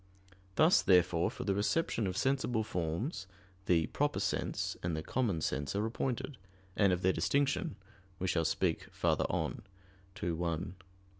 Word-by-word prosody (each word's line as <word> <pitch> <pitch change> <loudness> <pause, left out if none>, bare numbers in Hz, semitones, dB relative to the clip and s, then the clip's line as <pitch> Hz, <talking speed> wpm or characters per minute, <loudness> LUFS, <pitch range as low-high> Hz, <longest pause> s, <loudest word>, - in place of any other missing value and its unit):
Thus, 160 +3 +6
therefore, 90 -2 +4
for - - -6
the 100 - +1
reception 105 - +1
of 90 0 -3
sensible 130 -4 +1
forms, 95 - -3 0.4
the 85 -3 +4
"proper - - 0
sense" - - -1
and 85 -2 -1
the 80 - -3
common 105 -9 0
sense 70 +5 -2
are 105 +2 +1
appointed, 125 +3 -3 0.4
and 100 -2 +4
of 90 +1 0
their 95 +1 +4
distinction 140 -6 +1 0.4
we 95 - -2
shall 85 -2 +2
speak 80 +1 0
farther - - +1
on - - -2 0.6
(ad 85 - 0
1, 85 +1 -2
2). 90 - -21
95 Hz, 155 wpm, -33 LUFS, 85-115 Hz, 0.6 s, Thus